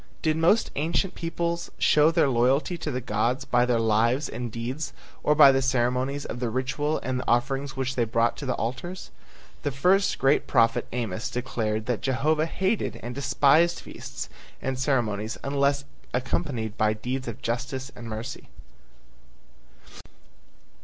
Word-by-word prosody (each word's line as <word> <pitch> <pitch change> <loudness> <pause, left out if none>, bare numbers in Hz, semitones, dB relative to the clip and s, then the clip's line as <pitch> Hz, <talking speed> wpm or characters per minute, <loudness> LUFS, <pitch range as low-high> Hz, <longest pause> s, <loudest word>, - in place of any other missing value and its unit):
Did 155 -1 +2
most 170 +8 +3
ancient 165 +5 0
peoples 170 0 -3
show 150 +1 +5
their 165 -3 +3
loyalty 135 +7 +2
to 165 - -4
the 130 -3 -2
gods 120 +3 0
by 120 0 +2
their 120 -1 +2
lives 115 +5 +2
and 120 0 -5
deeds 125 +7 -4 0.3
or 150 - +3
by 145 -2 +9
the 135 0 +2
ceremonies 130 +2 0
of 120 - -5
the 120 -2 -1
ritual 140 +5 -1
and 130 +1 -1
the - - -6
offerings 135 +3 0
which 130 0 -1
they 120 - +1
brought 115 +1 +1
to 140 - -6
the 125 - 0
altars? 175 +11 -5 0.5
The - - -1
first 180 +9 +2
great 135 +2 +2
prophet 115 -1 +3
Amos 115 -1 -3
declared 110 -4 -2
that 120 -2 -1
Jehovah 150 +4 +1
hated 190 +5 -1
and 120 - -5
despised 140 +5 +3
feasts - - -8 0.3
and 130 -1 -3
ceremonies 115 -5 0
unless 140 0 +1 0.3
accompanied 125 -4 -2
by 110 0 +3
deeds 125 +4 -4
of 115 +3 -7
justice 125 +3 -3
and 120 - -9
mercy. 115 +4 -6
130 Hz, 155 wpm, -26 LUFS, 120-145 Hz, 0.5 s, by